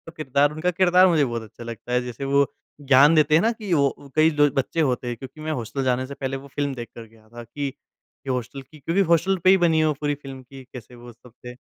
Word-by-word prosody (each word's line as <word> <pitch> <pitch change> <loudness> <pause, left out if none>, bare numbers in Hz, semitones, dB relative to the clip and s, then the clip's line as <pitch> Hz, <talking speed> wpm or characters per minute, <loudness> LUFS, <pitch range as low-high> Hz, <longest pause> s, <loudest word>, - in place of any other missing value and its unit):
किरदार 145 -1 +1
उनका 165 +4 -1
किरदार 185 +1 +4
मुझे 160 -5 +3
बहुत 120 -2 -4
अच्छा 110 +2 -13
लगता 115 +1 -7
है 125 - +2
जैसे 125 +2 -6
वो 140 +1 +3 0.4
ज्ञान 140 +3 +5
देते 155 0 +4
हैं 165 - +4
ना 225 +4 +2
कि 210 -5 -4
वो 140 -1 0
कई 155 +1 +4
बच्चे 145 +2 +1
होते 125 -3 -1
हैं 120 - -3
क्योंकि 135 +3 -11
मैं 155 0 -3
हॉस्टल 130 0 -4
जाने 130 0 0
से 140 - -8
पहले 135 -1 -4
वो 140 - -12
फ़िल्म 140 0 -3
देख 120 -2 -7
कर 115 - -9
गया 110 0 -23
था 120 0 -10
कि 140 +5 -5
ये 135 0 -14
हॉस्टल 125 +2 -5
की 150 +3 -17
क्योंकि 170 +8 0
हॉस्टल 185 +3 +2
पे 185 - +5
ही 190 - +6
बनी 165 -3 +2
है 155 - +3
वो 150 - +1
पूरी 145 -1 0
फ़िल्म 135 -2 -10
की 135 +1 -13
कैसे 125 0 -11
वो 120 0 -12
सब 120 +1 -19
थे। 125 - -7
140 Hz, 255 wpm, -23 LUFS, 125-155 Hz, 0.4 s, ही